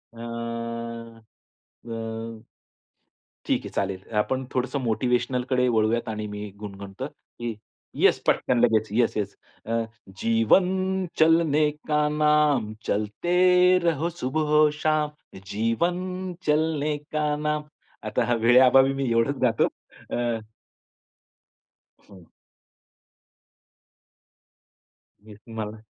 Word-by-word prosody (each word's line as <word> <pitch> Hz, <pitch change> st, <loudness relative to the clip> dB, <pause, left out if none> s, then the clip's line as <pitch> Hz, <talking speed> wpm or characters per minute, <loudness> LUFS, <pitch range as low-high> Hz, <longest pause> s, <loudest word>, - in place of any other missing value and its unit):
आं, 115 Hz, 0 st, -6 dB, 0.7 s
अ. 115 Hz, 0 st, -6 dB, 1.1 s
ठीक -, -, +1 dB
आहे -, -, -5 dB
चालेल. 95 Hz, -1 st, -1 dB, 0.2 s
आपण 130 Hz, +5 st, -1 dB
थोडंसं 130 Hz, +2 st, -1 dB
मोटिव्हेशनलकडे 125 Hz, +2 st, 0 dB
वळूयात 115 Hz, 0 st, +1 dB
आणि 105 Hz, -1 st, -4 dB
मी 105 Hz, 0 st, -6 dB
गुणगणतो, 100 Hz, +3 st, -7 dB
की 120 Hz, -5 st, -8 dB, 0.4 s
येस -, -, +4 dB
पटकन 125 Hz, -, +2 dB
लगेच. 110 Hz, -2 st, +3 dB
Yes, 115 Hz, +2 st, +2 dB
yes. 100 Hz, -1 st, -3 dB, 0.3 s
अ, 115 Hz, +1 st, 0 dB, 0.4 s
"जीवन 185 Hz, -, +2 dB
चलने 160 Hz, -2 st, +4 dB, 0.2 s
का 150 Hz, -1 st, +2 dB
नाम, 150 Hz, -7 st, +3 dB
चलते 110 Hz, +13 st, -1 dB, 0.5 s
रहो 165 Hz, -1 st, +1 dB
सुबहो 150 Hz, -1 st, +2 dB
शाम. 155 Hz, -1 st, +1 dB, 0.4 s
जीवन 180 Hz, -, -1 dB
चलने 150 Hz, -1 st, +1 dB
का 150 Hz, +1 st, -3 dB
नाम." 150 Hz, 0 st, -1 dB, 0.4 s
आता -, -, 0 dB
हा 120 Hz, -, +1 dB
वेळेअभावी 130 Hz, +3 st, +6 dB
मी 135 Hz, -2 st, -2 dB
एवढचं 115 Hz, +4 st, +1 dB
गातो 120 Hz, -3 st, +3 dB, 0.5 s
अ, 120 Hz, -1 st, -1 dB, 1.7 s
हं. 95 Hz, -4 st, -16 dB, 3.0 s
मीचं 110 Hz, +1 st, -14 dB
मला. 110 Hz, 0 st, -4 dB
120 Hz, 95 wpm, -25 LUFS, 115-150 Hz, 3.0 s, वेळेअभावी